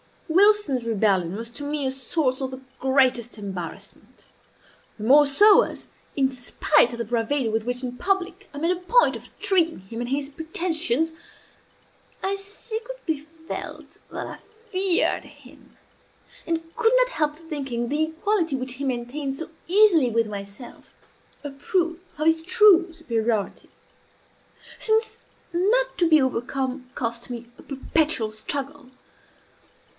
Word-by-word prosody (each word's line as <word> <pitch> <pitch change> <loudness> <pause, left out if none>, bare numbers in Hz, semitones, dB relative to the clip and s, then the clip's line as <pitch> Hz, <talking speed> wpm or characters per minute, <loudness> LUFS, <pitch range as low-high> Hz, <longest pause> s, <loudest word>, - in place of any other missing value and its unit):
Wilson's 380 - +4
rebellion 195 -6 +1
was 230 +2 -7
to 285 - -9
me 290 -1 -2
a 260 - 0
source 265 0 -1
of 265 0 -2
the 260 0 -8 0.2
greatest 260 -3 +2
embarrassment; 190 -5 -8 0.7
the 210 - -7
more 285 +5 +6
so 410 +10 +7
as, - - -5 0.3
in 270 -1 +2
spite 255 +2 +2
of - - -5
the 235 - -3
bravado 235 +2 0
with 225 0 -1
which 245 +1 -2
in 250 -1 -4
public 385 +3 -1
I - - -8
made 330 +4 +1
a 360 - -1
point 475 +7 +4
of - - -12
treating 340 -4 +2
him 195 +5 -9
and 240 0 -3
his 275 +1 -1
pretensions, 320 -1 0 1.1
I 385 - +1
secretly 435 -1 -5
felt 320 +2 -8
that - - -5
I - - -8 0.3
feared 370 -2 +1
him, - - -17 0.7
and 330 0 -3
could 455 0 +3
not - - +4
help 300 -10 -1
thinking 275 -7 -4
the 305 +2 +1
equality, 330 -1 0
which 255 -1 -4
he 280 - -6
maintained 270 +2 -3
so 320 - -6 0.2
easily 360 - +5
with 230 0 +2
myself, 200 +4 -9 0.5
a 290 - -5
proof 335 +4 -1 0.2
of 305 - -1
his 325 0 +4
true 370 -2 +5
superiority; 230 - -2 1.1
since 440 0 +1 0.3
not 460 +9 +2
to 340 -2 +3
be 310 -1 +7
overcome 260 +1 -2
cost 235 0 -3
me 240 -1 -6
a - - -13
perpetual 275 -4 0
struggle. 275 +5 -5
285 Hz, 140 wpm, -24 LUFS, 245-345 Hz, 1.1 s, so